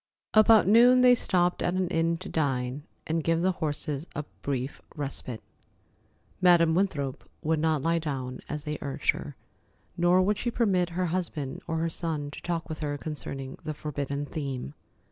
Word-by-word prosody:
About 215 -2 +7
noon 245 +4 +7
they 250 0 +8
stopped 180 -6 +1
at 175 - 0
an 185 -1 +1
inn 165 -1 +1
to 185 - -9
dine, 135 -2 -1 0.2
and 160 0 -1
give 165 +1 +1
the 190 - +3
horses 150 -3 -3
a 150 - -2 0.2
brief 135 -1 -3
respite. 135 -5 -5 1.0
Madam 170 -3 +6
Winthrop 155 -8 -1
would 160 0 +1
not 155 -3 +1
lie 165 0 +2
down, 130 -5 -4
as 150 0 -4
they 150 -1 -4
urged 140 -2 +1
her, 70 +1 -8 0.6
nor 175 +1 +4
would 205 +2 +1
she 240 - -1
permit 195 -7 +1
her 185 - +1
husband 165 -6 -3
or 165 - -1
her 165 +1 0
son 155 -4 -3
to - - -9
talk 170 -2 -2
with 155 - -5
her 145 -2 -2
concerning 140 -3 -6
the 155 - -4
forbidden 145 -1 -3
theme. 135 - -4
160 Hz, 170 wpm, -28 LUFS, 145-180 Hz, 1.0 s, they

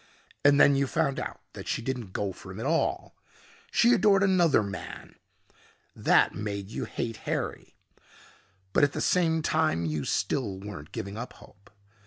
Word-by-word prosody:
And 145 0 +6
then 140 - +7
you 135 0 +1
found 140 -1 0
out - - -6
that - - -9
she 120 - -2
didn't 125 -6 -4
go 100 +1 -2
for 95 - -11
him 95 - -8
at 115 - -4
all. 165 +3 0 0.5
She 240 - +4
adored 205 -4 +4
another 175 - +4
man. 100 -2 -7 0.8
That - - +3
made 100 -1 -5
you - - -3
hate 115 -2 -4
Harry. - - -4 1.0
But - - +4
at 145 - +3
the - - -3
same 165 -3 +2
time 155 - +1
you 75 -2 -2
still 105 -9 -1
weren't 95 -7 -9
giving 100 +2 -5
up 120 +2 -6
hope. 100 0 -18
125 Hz, 165 wpm, -28 LUFS, 100-160 Hz, 1.0 s, then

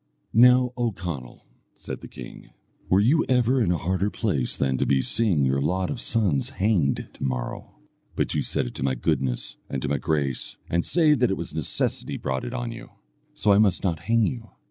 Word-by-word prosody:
"Now, 125 +2 +5
O 120 -2 0
Conall," 85 - -7 0.3
said - - -8
the - - -9
king, - - -11 0.4
"were 95 - +4
you 135 +10 +4
ever 125 0 +3
in 95 -6 +2
a 90 - +1
harder 95 +5 -1
place 95 - 0
than 65 -2 0
to - - +1
be 70 - +3
seeing 90 - +3
your 65 +1 +1
lot 90 +5 0
of 125 - -3
sons 95 -12 +2
hanged 95 -9 0
to - - -9
morrow? 65 -2 -4 0.4
But - - -1
you - - 0
set - - 0
it - - -6
to - - -8
my 65 -1 +1
goodness 65 0 -2
and 65 - -2
to - - -1
my 70 -1 0
grace, 70 -1 -2
and 85 0 0
say 160 -3 +3
that 125 -4 +2
it 95 - -1
was 85 - -6
necessity 80 -3 -2
brought 65 0 -3
it 120 - -5
on 120 -2 -3
you, 115 - -10 0.5
so 105 - +3
I 100 - +5
must 100 -4 +3
not 85 -5 0
hang 115 +6 +2
you. 115 -2 -4
95 Hz, 210 wpm, -25 LUFS, 70-115 Hz, 0.5 s, Now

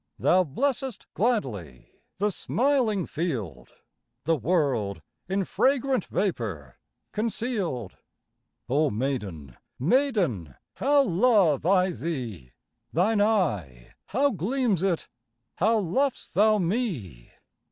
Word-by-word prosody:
Thou 185 +1 +4
blessest 255 - -2
gladly 110 - -2 0.3
The 205 +2 +1
smiling 235 - +1
field, 110 - -4 0.5
The 165 +2 +2
world 140 - 0 0.3
in 195 0 0
fragrant 265 -2 +1
Vapour 105 - -3 0.3
conceal'd. 210 - -2 0.7
Oh 145 +4 +2
maiden, 105 - -4 0.2
maiden, 170 - +1 0.2
How 285 +1 +4
love 185 - +3
I 185 -1 +4
thee! 120 - -5 0.4
Thine 205 +6 +2
eye, 105 - 0
how 275 +7 +2
gleams 220 - 0
it! 185 -4 0 0.5
How 220 +5 +3
lov'st 230 +8 -1
thou 215 +3 +4
me! 170 - -2
180 Hz, 95 wpm, -26 LUFS, -, 0.7 s, Thou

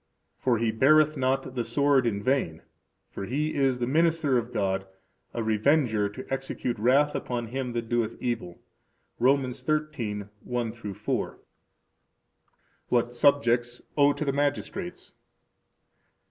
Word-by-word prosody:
For 125 -3 +2
he 115 0 +1
beareth 155 +6 +4
not 130 -1 0
the 125 -2 -1
sword 140 -1 +2
in 100 -3 -2
vain; 130 -12 0 0.5
for 100 - -5
he 150 +7 -1
is 135 -3 +2
the 120 - -1
minister 160 0 +2
of 120 0 0
God, 95 -2 -1 0.4
a 115 - -3
revenger 110 -1 +2
to 130 +6 -9
execute 130 -3 -3
wrath 140 +6 +3
upon 120 -1 -3
him 125 0 -3
that 120 -1 -3
doeth 115 -1 0
evil. 115 -8 -3 0.6
Rom. 135 +3 +4
13:1 120 -6 -3
4. - - -3 1.5
What 120 0 +1
Subjects 120 -3 +2
Owe 145 -1 +5
to 150 - -4
the 140 - 0
Magistrates. 145 +6 -3
125 Hz, 125 wpm, -27 LUFS, 115-140 Hz, 1.5 s, Owe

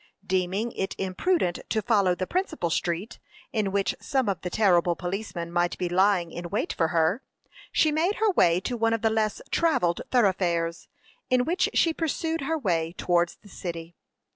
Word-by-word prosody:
Deeming 190 +5 0
it 195 - -3
imprudent 190 - 0
to 220 - +1
follow 200 -5 +2
the 185 - -2
principal 315 - -2
street, 175 +7 -2 0.3
in 210 -4 0
which 200 0 +1
some 265 -4 0
of 195 -5 -1
the 180 - -3
terrible 175 -4 +3
policemen 175 -2 -4
might 175 0 0
be 180 - -1
lying 180 -1 +2
in 175 +1 -6
wait - - -1
for 165 - +1
her, 165 +8 +1 0.5
she 310 - +3
made 335 +7 +1
her 440 -1 +2
way 175 - +4
to 245 +6 -3
one 225 -1 +1
of 225 - -2
the 225 - +3
less 215 -1 0
travelled 180 - +2
thoroughfares, 180 -7 +1 0.4
in 250 -1 +3
which 355 +5 +1
she 330 - +3
pursued 325 0 -2
her 320 +4 -1
way 170 - -1
towards 175 -1 +1
the - - -15
city. 170 -3 -7
195 Hz, 175 wpm, -26 LUFS, 175-240 Hz, 0.5 s, way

